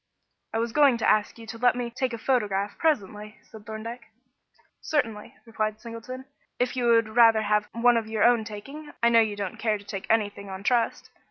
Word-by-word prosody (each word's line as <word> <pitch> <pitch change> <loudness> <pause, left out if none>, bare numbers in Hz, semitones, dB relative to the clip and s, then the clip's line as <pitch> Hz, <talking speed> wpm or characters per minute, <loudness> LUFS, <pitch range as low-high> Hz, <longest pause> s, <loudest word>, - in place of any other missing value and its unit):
"I - - -2
was 230 +1 -1
going 280 -2 +4
to - - -1
ask 215 +1 +2
you 230 - -11
to 225 +1 -8
let 245 0 +3
me 245 -1 -4
take 255 +1 -2
a 230 - -4
photograph 210 -5 0
presently," 210 - -1
said 220 0 -15
Thorndyke. 225 +2 -7 0.7
"Certainly," 230 -5 -2
replied 215 -2 -2
Mr. 215 - -29
Singleton, 245 +3 -8 0.3
"if 250 +1 -1
you 250 -1 -1
would 230 -2 +4
rather 225 -1 +5
have 210 0 +1
one 235 +1 +4
of 225 -1 -2
your 220 -1 0
own 240 -2 +4
taking. 275 +9 -9
I 235 - +6
know 230 -1 +6
you 215 -2 -1
don't 200 -3 -5
care 215 -2 0
to 200 - -16
take 195 -1 -6
anything 205 -2 0
on 190 0 -7
trust. 250 +2 0
225 Hz, 205 wpm, -26 LUFS, 210-245 Hz, 0.7 s, I